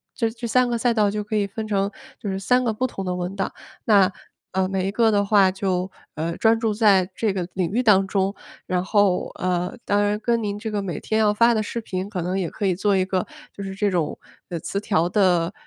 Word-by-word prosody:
这 230 Hz, -, 0 dB
这 235 Hz, +1 st, -6 dB
3 250 Hz, +2 st, +3 dB
个 240 Hz, -, 0 dB
小 -, -, -6 dB
赛 245 Hz, -2 st, +3 dB
道 210 Hz, -2 st, +2 dB
就 210 Hz, -, -2 dB
可 215 Hz, -, -3 dB
以 205 Hz, -1 st, +2 dB
分 215 Hz, +2 st, -5 dB
成 200 Hz, -1 st, 0 dB, 0.3 s
就 205 Hz, -, -5 dB
是 190 Hz, 0 st, -2 dB
3 250 Hz, +7 st, +2 dB
个 235 Hz, -, +1 dB
不 255 Hz, +4 st, -1 dB
同 195 Hz, -, -6 dB
的 180 Hz, -, -1 dB
文 180 Hz, +2 st, -4 dB
档， 195 Hz, -1 st, -2 dB, 0.3 s
那， 200 Hz, -3 st, +5 dB, 0.4 s
呃， 190 Hz, 0 st, +1 dB
每 190 Hz, 0 st, -1 dB
一 -, -, -1 dB
个 225 Hz, +1 st, +3 dB
的 200 Hz, -1 st, +3 dB
话 200 Hz, -2 st, +5 dB
就， 185 Hz, -1 st, -2 dB, 0.2 s
呃， 165 Hz, +2 st, -2 dB
专 225 Hz, 0 st, +3 dB
注 220 Hz, -2 st, 0 dB
在 200 Hz, -4 st, +4 dB
这 220 Hz, +1 st, 0 dB
个 180 Hz, -3 st, -3 dB
领 185 Hz, -3 st, -1 dB
域 245 Hz, +4 st, +1 dB
当 195 Hz, -4 st, +5 dB
中， 195 Hz, 0 st, 0 dB, 0.3 s
然 180 Hz, 0 st, 0 dB
后， 200 Hz, -2 st, +2 dB
呃， 180 Hz, -1 st, -2 dB
当 205 Hz, 0 st, +2 dB
然 205 Hz, 0 st, +1 dB
跟 235 Hz, +1 st, 0 dB
您 205 Hz, -1 st, -3 dB
这 220 Hz, +1 st, -5 dB
个 205 Hz, -, -1 dB
每 180 Hz, -6 st, -4 dB
天 220 Hz, -, -1 dB
要 215 Hz, -1 st, +4 dB
发 235 Hz, +2 st, +4 dB
的 220 Hz, -, +1 dB
视 225 Hz, +2 st, -4 dB
频 190 Hz, -2 st, -4 dB
可 185 Hz, -5 st, -3 dB
能 185 Hz, +2 st, -1 dB
也 175 Hz, -4 st, -2 dB
可 205 Hz, -, -4 dB
以 185 Hz, -, +3 dB
做 200 Hz, +2 st, +1 dB
一 185 Hz, -, +3 dB
个 185 Hz, -1 st, -1 dB, 0.3 s
就 200 Hz, -, -7 dB
是 195 Hz, 0 st, -6 dB
这 205 Hz, 0 st, +1 dB
种 170 Hz, -5 st, -1 dB, 0.5 s
词 200 Hz, -, -2 dB
条 175 Hz, -5 st, +1 dB
的 180 Hz, -3 st, +2 dB
200 Hz, 260 characters per minute, -23 LUFS, 185-215 Hz, 0.5 s, 那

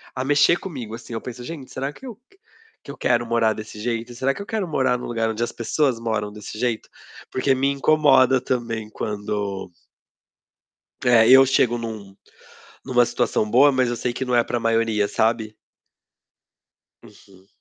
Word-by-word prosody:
a 130 Hz, -, -2 dB
mexer 145 Hz, +5 st, +4 dB
comigo. 125 Hz, -, -7 dB
Assim, 120 Hz, 0 st, -10 dB
eu 115 Hz, -, -4 dB
penso: 125 Hz, -1 st, -8 dB
"Gente, 140 Hz, -1 st, -8 dB
será 135 Hz, +2 st, -3 dB
que 270 Hz, -, -14 dB
eu 235 Hz, -4 st, -9 dB, 0.6 s
que -, -, -8 dB
eu -, -, -11 dB
quero 120 Hz, -1 st, +1 dB
morar 115 Hz, -1 st, +2 dB
desse 110 Hz, 0 st, -9 dB
jeito? 115 Hz, +1 st, -3 dB
Será 135 Hz, +3 st, 0 dB
que -, -, -8 dB
eu 200 Hz, -, -7 dB
quero 210 Hz, -4 st, -3 dB
morar 130 Hz, -5 st, +1 dB
no 125 Hz, -, -7 dB
lugar 115 Hz, -1 st, -1 dB
onde 110 Hz, +1 st, -2 dB
as 120 Hz, -, -3 dB
pessoas 125 Hz, +1 st, 0 dB
moram 110 Hz, -3 st, -2 dB
desse 105 Hz, 0 st, -9 dB
jeito?". 120 Hz, -2 st, -2 dB, 0.4 s
Porque 135 Hz, +1 st, +1 dB
me 135 Hz, +2 st, +1 dB
incomoda 135 Hz, -3 st, +4 dB
também 115 Hz, -4 st, -3 dB
quando 105 Hz, -3 st, -4 dB, 1.3 s
É, 115 Hz, -2 st, +5 dB
eu 135 Hz, +1 st, +8 dB
chego 125 Hz, -2 st, +2 dB
em 115 Hz, -, -5 dB
um 100 Hz, -3 st, -8 dB, 0.7 s
em -, -, -10 dB
uma 125 Hz, -1 st, +5 dB
situação 105 Hz, -2 st, -1 dB
boa, 135 Hz, +5 st, +6 dB
mas 130 Hz, -3 st, +1 dB
eu 120 Hz, -, -3 dB
sei 120 Hz, +1 st, -2 dB
que 130 Hz, -, -3 dB
não 125 Hz, -1 st, -3 dB
é 120 Hz, -, +4 dB
para 120 Hz, -, -2 dB
a -, -, -2 dB
maioria, 115 Hz, -2 st, +1 dB
sabe. 110 Hz, -1 st, 0 dB, 1.5 s
Uhum. 95 Hz, -1 st, -19 dB
120 Hz, 185 wpm, -22 LUFS, 110-130 Hz, 1.5 s, eu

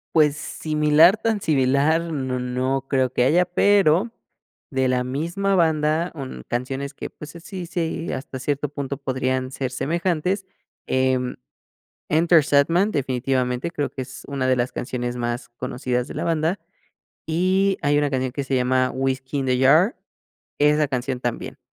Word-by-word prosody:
Pues 150 Hz, -2 st, +5 dB
similar, 155 Hz, +4 st, +3 dB
tan 220 Hz, -1 st, -1 dB
similar, 140 Hz, +1 st, +2 dB
no 130 Hz, -3 st, -2 dB
no 130 Hz, +2 st, -1 dB
creo 130 Hz, -2 st, +1 dB
que 125 Hz, -, +1 dB
haya, 170 Hz, +7 st, +4 dB
pero, 195 Hz, +2 st, +3 dB, 0.6 s
de 130 Hz, -1 st, +1 dB
la 125 Hz, 0 st, +1 dB
misma 170 Hz, +10 st, -1 dB
banda, 160 Hz, 0 st, +2 dB
un 130 Hz, -, -7 dB
canciones 135 Hz, +3 st, -3 dB
que, -, -, -7 dB
pues, 150 Hz, +2 st, -11 dB
así 180 Hz, +2 st, -7 dB
sí 165 Hz, -1 st, -3 dB
hasta 130 Hz, 0 st, -6 dB
cierto 145 Hz, +1 st, -2 dB
punto 140 Hz, -2 st, -4 dB
podrían 130 Hz, -1 st, -1 dB
ser 130 Hz, -1 st, -3 dB
semejantes, 175 Hz, +6 st, -1 dB, 0.4 s
em, 130 Hz, -1 st, 0 dB, 0.7 s
Enter 165 Hz, +1 st, +4 dB
Sandman 165 Hz, +8 st, +3 dB
definitivamente 130 Hz, -, -1 dB
creo 145 Hz, -4 st, -2 dB
que 135 Hz, -, -5 dB
es 125 Hz, -, -10 dB
una 135 Hz, -2 st, -2 dB
de 130 Hz, -, +3 dB
las 120 Hz, +1 st, -1 dB
canciones 120 Hz, -1 st, -3 dB
más 120 Hz, 0 st, -3 dB
conocidas 125 Hz, +1 st, -3 dB
de -, -, -8 dB
la -, -, -3 dB
banda, 165 Hz, +3 st, 0 dB, 0.7 s
y 185 Hz, +4 st, +2 dB
hay 145 Hz, 0 st, +3 dB
una 145 Hz, -1 st, +2 dB
canción 130 Hz, -1 st, -1 dB
que 140 Hz, -, -3 dB
se 135 Hz, -1 st, 0 dB
llama 130 Hz, 0 st, +2 dB
Whiskey 135 Hz, +1 st, -2 dB
in 135 Hz, -, -2 dB
the 125 Hz, -1 st, +2 dB
Jar, 155 Hz, -, +5 dB, 0.6 s
esa 150 Hz, 0 st, +3 dB
canción 130 Hz, -1 st, -2 dB
también. 120 Hz, -2 st, -4 dB
140 Hz, 155 wpm, -23 LUFS, 130-165 Hz, 0.7 s, Pues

